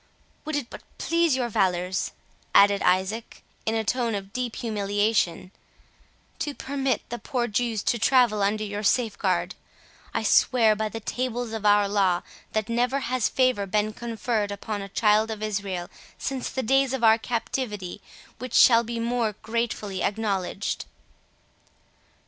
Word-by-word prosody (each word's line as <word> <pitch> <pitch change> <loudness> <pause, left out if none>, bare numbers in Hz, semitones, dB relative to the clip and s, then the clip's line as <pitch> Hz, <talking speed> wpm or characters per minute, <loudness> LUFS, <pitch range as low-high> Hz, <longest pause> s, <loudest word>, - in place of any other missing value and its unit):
"Would 310 0 -2
it 285 -5 -3
but - - -9 0.2
please 335 -4 +2
your 250 -2 0
valours," 185 -2 0 0.4
added 200 0 +6
Isaac, 190 +5 0 0.2
in 220 - +1
a 225 - 0
tone 235 0 0
of 195 0 -6
deep 250 -2 -3
humiliation, 205 -4 0 0.9
"to 290 -2 -3
permit 270 -3 -2
the 240 - -4
poor 245 -2 -1
Jews 225 -1 -1
to 235 - +1
travel 240 -3 +4
under 210 +2 +1
your 205 0 -4
safeguard, 205 -5 +1 0.6
I - - -1
swear 225 -4 +4
by 215 0 -2
the 225 - -6
tables 245 0 -3
of 215 -2 -1
our 205 0 +5
law, 195 -3 +2 0.3
that 215 -1 0
never 245 +4 0
has 255 -3 0
favour 255 -6 +1
been 210 +2 0
conferred 225 -2 -2
upon 205 +1 -4
a 195 - -7
child 215 +1 +3
of 215 -1 -5
Israel 195 -4 -3 0.3
since 265 -1 -3
the 260 - -3
days 270 +2 +2
of 265 -3 -3
our 225 0 +6
captivity, 220 -5 -3 0.4
which 255 0 -5
shall 235 -1 +7
be 235 0 -4
more 230 -2 0
gratefully 220 -4 -2
acknowledged." 200 -2 -2
220 Hz, 150 wpm, -25 LUFS, 205-245 Hz, 0.9 s, shall